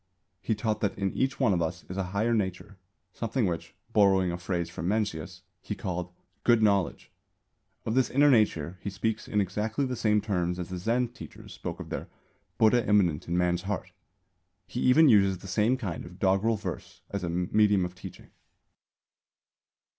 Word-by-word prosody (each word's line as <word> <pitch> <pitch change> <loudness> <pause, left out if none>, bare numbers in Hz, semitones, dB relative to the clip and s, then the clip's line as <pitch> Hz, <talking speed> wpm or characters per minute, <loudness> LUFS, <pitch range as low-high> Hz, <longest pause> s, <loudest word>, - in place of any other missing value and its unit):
He 110 - 0
taught 110 0 -2
that 100 -2 -1
in 100 -1 -1
each 130 +1 -1
one 120 -7 +3
of 85 - 0
us 80 +1 -3
is 90 - -6
a 95 -1 -1
"higher 110 +5 +1
nature," 100 -2 -2 0.4
something 115 +1 -1
which, 85 -3 -4 0.2
borrowing 95 -3 +4
a 85 - -3
phrase 90 -1 -2
from 85 +1 -5
Mencius, 100 -6 -2 0.2
he - - -5
called 90 -1 -4 0.3
"Good 120 -2 +4
Knowledge." 100 -4 +1 0.7
Of 110 - -1
this 130 0 +2
inner 145 +2 +5
nature 95 - +2
he 100 - -3
speaks 110 +3 -2
in 105 - 0
exactly 105 +7 -1
the 130 -1 -3
same 105 -2 +2
terms 90 -4 -1
as 90 -1 -5
the 90 -1 -4
Zen 120 +5 0
teachers 120 - -11
spoke - - -6
of - - -8
their - - -4 0.5
"Buddha 115 +2 +4
immanent 90 -7 +2
in 85 +1 0
man's 90 0 +1
heart." 100 -1 -4 0.7
He 120 - -6
even 150 +6 +6
uses 100 -6 +5
the 95 - -11
same 105 +7 +2
kind 95 -10 -4
of 90 +1 -11
doggerel 95 +4 +2
verse 90 -2 -7
as 100 -2 -3
a 85 - -2
medium 95 +3 +2
of 90 - -6
teaching. 90 - -11
100 Hz, 180 wpm, -28 LUFS, 90-110 Hz, 0.7 s, even